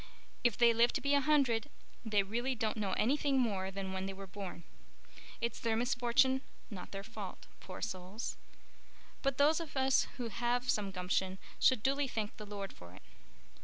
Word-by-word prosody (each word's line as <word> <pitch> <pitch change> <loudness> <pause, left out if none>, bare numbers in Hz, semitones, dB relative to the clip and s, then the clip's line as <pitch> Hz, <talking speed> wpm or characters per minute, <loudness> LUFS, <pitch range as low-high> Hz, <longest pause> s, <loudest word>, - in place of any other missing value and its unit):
If 240 -4 +3
they 235 -1 +6
live 235 +1 +5
to - - +1
be 280 0 +2
a 285 - +5
hundred 275 -4 +3 0.3
they 210 -3 +2
really 240 +6 -1
don't 220 -2 -1
know 205 -4 -1
anything 275 +2 +2
more 195 -6 0
than 195 0 -4
when 190 0 -2
they 195 - -4
were 195 0 -8
born. 190 -2 -7 0.8
It's 235 -1 -1
their 225 -1 +1
misfortune 245 +2 +3 0.3
not 185 -3 -7
their 195 0 -6
fault, 215 -3 -8
poor 185 - -8
souls. 190 +1 -4 0.9
But 275 -2 0
those 300 +3 +5
of 320 -4 -6
us 265 0 +4
who 240 -3 -3
have 240 +3 +1
some 205 -2 -1
gumption 185 0 -1 0.2
should 255 -5 +4
duly 275 +1 +2
thank 215 -4 -3
the 210 - -8
Lord 200 -1 -5
for 90 +1 -13
it." 95 - -14
225 Hz, 180 wpm, -34 LUFS, 195-260 Hz, 0.9 s, they